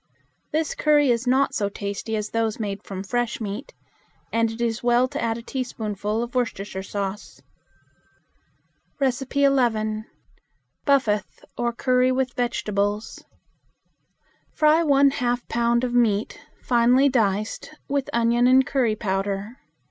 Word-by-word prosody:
This 310 0 0
curry 295 -3 +3
is 235 +1 -1
not 265 +2 +3
so 200 -1 0
tasty 200 +2 -4
as 210 -1 -3
those 225 -1 -1
made 200 -2 -3
from 190 -2 -7
fresh 240 +3 -2
meat, 215 +4 -5 0.6
and 230 0 +2
it 225 +1 -8
is 235 -1 -1
well 245 +1 +3
to - - -5
add 230 -1 -1
a 230 - -9
teaspoonful 220 -4 -3
of 240 - -7
Worcestershire 205 -6 -2
sauce. 200 +1 -5 1.6
11. 250 -5 +1 0.8
Buffath, 230 -8 +1
or 240 0 -1
Curry 255 +1 +2
with 255 -1 -1
Vegetables. 210 -3 -2 1.3
Fry 310 +1 +4
one 280 -2 +4
half 245 -2 -1
pound 235 +1 +1
of 245 -1 -1
meat, 225 -3 +1 0.2
finely 250 +3 +4
diced, 215 -5 0 0.2
with 280 -1 -1
onion 235 +1 +3
and 260 +1 +5
curry 245 -6 +1
powder. 200 +2 -3
235 Hz, 125 wpm, -24 LUFS, 210-255 Hz, 1.6 s, and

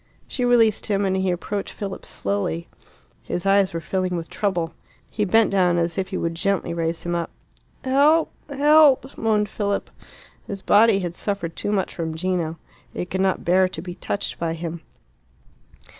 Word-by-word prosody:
She 250 - -3
released 235 -3 +3
him, 200 -1 +1
and 190 -1 +1
he 190 0 0
approached 195 +3 -3
Philip 195 -2 -6
slowly. 100 -5 -2 0.5
His 175 - -4
eyes 195 -1 +4
were 165 - -3
filling 185 +1 -2
with 165 0 -6
trouble. 175 -5 -1 0.4
He 210 - 0
bent 225 +3 +4
down, 180 -3 +3
as 170 -1 0
if 190 -1 -1
he 190 - -4
would 165 0 -1
gently 185 0 -1
raise 165 0 -2
him 175 - -2
up. 170 -1 -1 0.5
"Help! 290 +5 +4 0.2
help!" 285 -1 +4
moaned 215 -2 +1
Philip. 200 0 -2 0.6
His 195 -2 -6
body 210 -1 +5
had 175 -2 -3
suffered 185 -3 -3
too 205 - -2
much 195 -3 0
from 160 -2 -4
Gino. 170 -2 -1 0.4
It 180 - -4
could 190 - 0
not 190 -1 0
bear 185 +2 +4
to 185 - -7
be 175 +1 -6
touched 200 - -3
by 165 -1 -1
him. 165 0 -5
190 Hz, 175 wpm, -23 LUFS, 170-210 Hz, 0.6 s, body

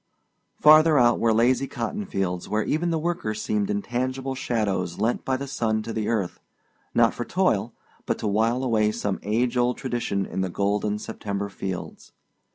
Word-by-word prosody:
Farther 155 0 +7
out 120 -2 +4
were 115 - +3
lazy 125 +4 +3
cotton 185 - -4
fields 90 -2 -2
where 105 +1 +1
even 165 +8 0
the 165 - +1
workers 155 -10 -2
seemed 105 -2 -1
intangible 130 +6 -2
shadows 100 -9 -1
lent 115 +4 0
by 130 -1 0
the 140 - -5
sun 110 -5 -1
to 115 - -5
the 110 -1 -2
earth, 105 -6 -1 0.6
not - - +4
for - - -4
toil, - - +1 0.4
but - - 0
to - - -3
while 115 +5 +1
away 110 -4 +2
some 105 -2 -2
age 120 +4 0
old 125 0 +2
tradition 120 -7 -2
in 95 - -3
the 95 - -1
golden 105 +2 0
September 100 -2 -4
fields. 95 -1 -6
110 Hz, 170 wpm, -25 LUFS, 100-130 Hz, 0.6 s, Farther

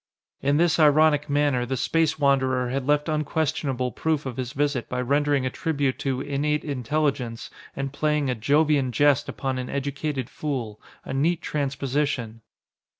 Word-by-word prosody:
In 140 +1 +2
this 170 0 +3
ironic 150 -1 +4
manner 145 -3 +2
the 130 +2 -2
Space 165 +2 +1
Wanderer 130 -3 +2
had 130 +1 -2
left 150 +1 +2
unquestionable 150 -4 -1
proof 155 +4 -1
of 130 -2 -5
his 125 -1 -3
visit 145 -3 -1
by 125 - -2
rendering 140 +1 +1
a 130 - -1
tribute 140 -4 -1
to 135 -2 -1
"innate 145 +2 -1
intelligence" 135 -3 -2 0.2
and 135 0 -4
playing 150 -1 0
a 125 - +1
Jovian 140 +2 +2
Jest 145 +3 +3
upon 130 -1 -3
an 125 - -5
educated 140 -1 -3
fool 125 -8 -4 0.2
a - - -5
neat 160 +5 +1
transposition. 135 -4 -2
140 Hz, 150 wpm, -25 LUFS, 130-150 Hz, 0.2 s, ironic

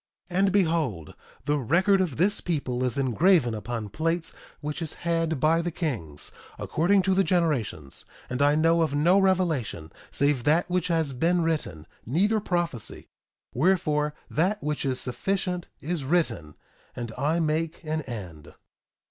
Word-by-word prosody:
1:11 175 - -2
And 195 0 +4
behold, 160 - 0 0.3
the 145 0 +1
record 185 - +3
of 165 -9 -2
this 200 +6 +2
people 135 -7 -2
is 125 -1 -1
engraven 140 - +3
upon 110 +1 -4
plates 165 - -1 0.3
which 150 +2 -4
is 160 -2 -3
had 165 -3 0
by 160 +4 +3
the 175 - -2
kings, 120 - -3 0.3
according 190 +5 +2
to 190 - +2
the 195 +1 +3
generations; 145 - -1 0.2
and 125 +2 -3
I 145 +1 +4
know 165 +2 +3
of 155 -3 +1
no 175 +7 +4
revelation 165 - 0 0.2
save 140 -3 +1
that 160 +4 +3
which 180 -1 0
has 160 -5 0
been 170 +6 +2
written, 150 - -2 0.2
neither 200 - +2
prophecy; 175 - -3 0.4
wherefore, 150 -1 +1
that 195 +6 0
which 150 -1 -2
is 130 -2 +1
sufficient 180 +6 -2
is 165 -1 -2
written. 135 - 0 0.4
And 120 -2 -5
I 150 +5 +1
make 160 +1 -1
an 155 0 -2
end. 95 - -8
155 Hz, 150 wpm, -26 LUFS, 130-175 Hz, 0.4 s, And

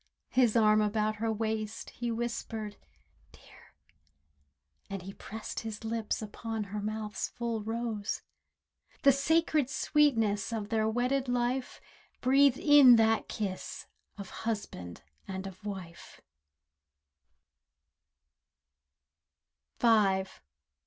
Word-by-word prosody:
His 245 -4 +3
arm 215 -1 +5
about 215 0 0
her 225 +1 0
waist, 220 0 -3
he 240 0 -4
whispered 225 -2 -4 0.6
"Dear," - - -19 1.1
And 195 0 -6
pressed 220 +1 -6
his 220 -1 -6
lips 225 -1 -2
upon 220 +1 -4
her 205 +1 -5
mouth's 215 0 -3
full 235 -2 -3
rose— 225 -2 -3 0.8
The 275 - +8
sacred 300 0 +2
sweetness 235 -9 +2
of 215 -2 -3
their 220 -1 +1
wedded 250 +3 0
life 245 +1 -1 0.4
Breathed 270 0 +4
in 290 -5 +8
that 225 0 +2
kiss 195 -3 -4 0.3
of 200 -2 -8
husband 90 - -5 0.2
and 190 0 -5
of 190 +1 -9
wife. 190 -5 -8
220 Hz, 95 wpm, -30 LUFS, 210-240 Hz, 1.1 s, The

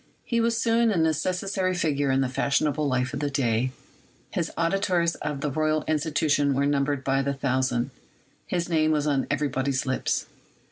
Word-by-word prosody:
He 235 -1 0
was 230 0 +1
soon 230 0 +3
a 205 - +1
necessary 185 +4 0
figure 145 -5 0
in 135 0 +2
the 135 - +1
fashionable 145 +3 0
life 130 0 0
of 140 - -3
the 145 0 -1
day; 130 -2 0 0.6
his - - -2
auditors 170 0 +1
at 150 -2 -3
the 150 - -1
Royal 155 +1 +1
Institution 150 -2 +1
were 140 +1 +2
numbered 140 -1 0
by 135 0 +1
the 140 0 -1
thousand; 130 -1 0 0.6
his 175 -1 -1
name 155 -2 +2
was 150 -2 +1
on 140 -3 +1
everybody's 140 -2 0
lips. 130 -1 -1
145 Hz, 170 wpm, -26 LUFS, 135-165 Hz, 0.6 s, soon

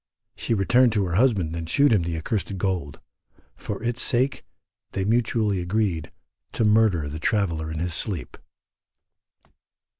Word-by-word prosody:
She 115 - -1
returned 120 +5 +4
to 105 -3 +1
her 90 - -3
husband 95 -7 +2
and 80 -1 -5
shewed 140 +6 +4
him 100 - +3
the 85 -1 -3
accursed 100 +3 -3
gold: 90 -7 -2 0.6
for - - -6
its 120 +1 0
sake 130 +2 +1 0.5
they 95 - -1
mutually 110 -3 +1
agreed 90 -3 -1 0.4
to 115 - +1
murder 105 -8 +3
the 75 +2 -6
traveller 85 -5 0
in 80 - -4
his 85 +1 -2
sleep. 85 - -3
100 Hz, 145 wpm, -24 LUFS, 85-115 Hz, 0.6 s, returned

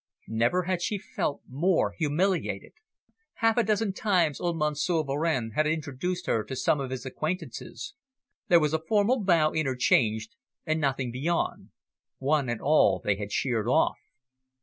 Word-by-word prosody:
Never 120 +11 +2
had 180 0 -1
she 205 +4 -1
felt 145 -6 -3
more 165 +7 +1
humiliated. 175 +4 -1 0.6
Half 225 -1 +2
a 240 - +4
dozen 210 -1 0
times 180 -8 +1
kind - - -4
old 170 -1 -1
Monsieur 150 +2 0
Varenne 140 -4 -1
had 155 +7 +1
introduced 155 +3 -2
her 110 - +1
to 130 - -6
some 145 - +1
of 135 -2 -3
his 130 0 -5
acquaintances. 170 - -5 0.5
There 175 - +6
was 150 -1 0
a 160 - +2
formal 210 +7 +2
bow 165 -5 +3
interchanged, 130 - +1 0.3
and 155 -1 0
nothing 135 -3 -1
beyond; 160 +8 -2 0.5
one 140 -1 +1
and 120 -2 -2
all 155 +3 +4
they 100 -2 0
had 100 0 -6
sheered 115 -3 0
off. 125 - +2
155 Hz, 155 wpm, -27 LUFS, 130-180 Hz, 0.6 s, There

